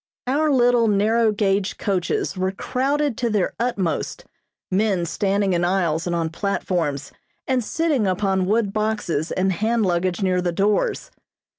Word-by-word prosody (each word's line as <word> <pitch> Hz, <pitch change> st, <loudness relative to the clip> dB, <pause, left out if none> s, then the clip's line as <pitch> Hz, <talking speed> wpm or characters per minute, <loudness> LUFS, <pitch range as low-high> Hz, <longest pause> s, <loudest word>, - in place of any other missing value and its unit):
Our 295 Hz, +5 st, +1 dB
little 245 Hz, -3 st, +4 dB
narrow 220 Hz, +2 st, +3 dB
gauge 200 Hz, -1 st, 0 dB
coaches 190 Hz, -1 st, -1 dB
were 185 Hz, 0 st, -1 dB
crowded 275 Hz, +5 st, -1 dB
to 240 Hz, -, 0 dB
their 210 Hz, -4 st, 0 dB
utmost, 205 Hz, -8 st, -2 dB, 0.5 s
men 190 Hz, -2 st, +1 dB
standing 195 Hz, +2 st, 0 dB
in 175 Hz, 0 st, +1 dB
aisles 175 Hz, -3 st, 0 dB
and 175 Hz, -, -1 dB
on 165 Hz, -1 st, -1 dB
platforms, 165 Hz, -5 st, -2 dB, 0.3 s
and 255 Hz, -2 st, 0 dB
sitting 295 Hz, -5 st, 0 dB
upon 190 Hz, 0 st, 0 dB
wood 210 Hz, -1 st, +1 dB
boxes 210 Hz, -8 st, -1 dB
and 190 Hz, +1 st, +1 dB
hand 220 Hz, +3 st, 0 dB
luggage 180 Hz, +1 st, 0 dB
near 185 Hz, -1 st, +1 dB
the 175 Hz, -1 st, 0 dB
doors. 200 Hz, +4 st, 0 dB
200 Hz, 145 wpm, -22 LUFS, 180-225 Hz, 0.5 s, little